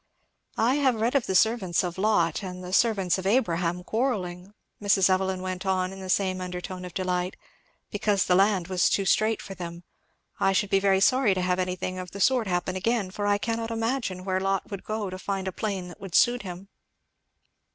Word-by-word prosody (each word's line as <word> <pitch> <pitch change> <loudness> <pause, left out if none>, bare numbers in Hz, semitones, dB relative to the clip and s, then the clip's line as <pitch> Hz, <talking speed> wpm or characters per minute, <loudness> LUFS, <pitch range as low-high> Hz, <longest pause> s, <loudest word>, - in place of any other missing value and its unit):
"I 245 +5 +3
have 265 -4 +3
read 230 +3 +1
of 275 -4 +1
the 190 - -1
servants 195 -4 +2
of 180 0 -4
Lot 190 -6 +2
and 185 -2 -7
the 180 +1 -7
servants 195 -5 +2
of 190 - -3
Abraham 180 -6 +1
quarrelling," 200 -5 -2 0.3
Mrs. 195 -2 +4
Evelyn 185 0 0
went 185 0 -4
on 190 -1 0
in 195 - -10
the 190 -1 -7
same 185 -1 +1
undertone 180 0 -6
of 180 - -10
delight, 180 -1 -1 0.6
"because 205 -2 +1
the 180 - +2
land 190 -2 +3
was 185 -2 +2
too 195 - +1
strait 215 +3 +2
for 195 - -7
them 170 -2 -7 0.6
I 195 - +3
should 200 +1 0
be 195 - +4
very 195 -1 +3
sorry 255 -3 +4
to 185 - -1
have 180 0 +1
anything 185 0 -2
of 180 0 -6
the 200 - -7
sort 245 +1 +3
happen 180 0 -1
again, 200 0 0
for 205 +2 -3
I 205 0 +3
cannot 225 +2 -2
imagine 225 -5 -2
where 185 -1 0
Lot 195 +1 -1
would 200 -2 -6
go 215 -3 -3
to 185 - -6
find 195 0 -3
a - - -1
plain 195 -2 -3
that 175 - -13
would 195 -3 -6
suit 245 0 +4
him." 185 0 -8
190 Hz, 205 wpm, -26 LUFS, 185-210 Hz, 0.6 s, Mrs